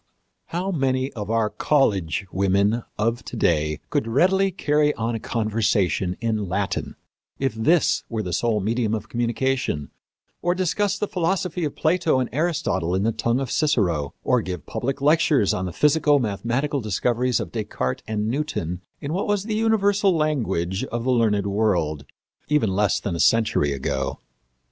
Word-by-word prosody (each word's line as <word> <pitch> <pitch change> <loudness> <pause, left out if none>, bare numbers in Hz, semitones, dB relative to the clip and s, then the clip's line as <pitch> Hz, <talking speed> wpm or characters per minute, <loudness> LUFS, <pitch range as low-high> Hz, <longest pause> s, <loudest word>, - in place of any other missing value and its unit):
How 180 +3 -2
many 135 -4 0
of 105 -3 -6
our 115 -2 +1
college 100 - +1
women 100 +4 +2 0.2
of 115 +3 0
to - - -8
day 75 -6 +1
could 110 - 0
readily 185 +11 +3
carry 150 -5 +1
on 115 +1 -2
a 115 - -2
conversation 105 -5 0
in 110 -4 -1
Latin, 100 +2 -2 0.4
if 135 -4 -1
this 150 +10 +2
were 110 -2 -2
the 90 -2 -4
sole 110 +2 +1
medium 110 +1 0
of 110 0 -6
communication, 120 - -1 0.5
or 175 +1 +1
discuss 190 +2 0
the 210 - -1
philosophy 180 -1 -1
of 145 - -4
Plato 165 -3 +2
and 125 - -1
Aristotle 130 - 0
in 95 - 0
the 115 - +2
tongue 115 +2 0
of 135 -3 -3
Cicero, 90 - +1
or 125 -2 +2
give 90 -6 -6
public 135 +2 -3
lectures 150 - +3
on 90 - -2
the 90 - -4
physico 150 - +3
mathematical 125 +5 -1
discoveries 120 +4 0
of - - -5
Descartes 105 - -3
and 105 -1 -1
Newton 110 - -2 0.2
in 145 +2 -3
what 190 - -1
was 205 -2 +1
the 215 +1 -3
universal 205 -4 +2
language 110 - -1
of 120 -2 -4
the 130 - +1
learned 110 -5 +2
world, 90 -9 0 0.4
even 150 -9 +2
less 100 +2 +2
than 95 -4 -3
a - - -4
century 105 -6 +3
ago? 65 0 -2
115 Hz, 165 wpm, -23 LUFS, 100-150 Hz, 0.5 s, readily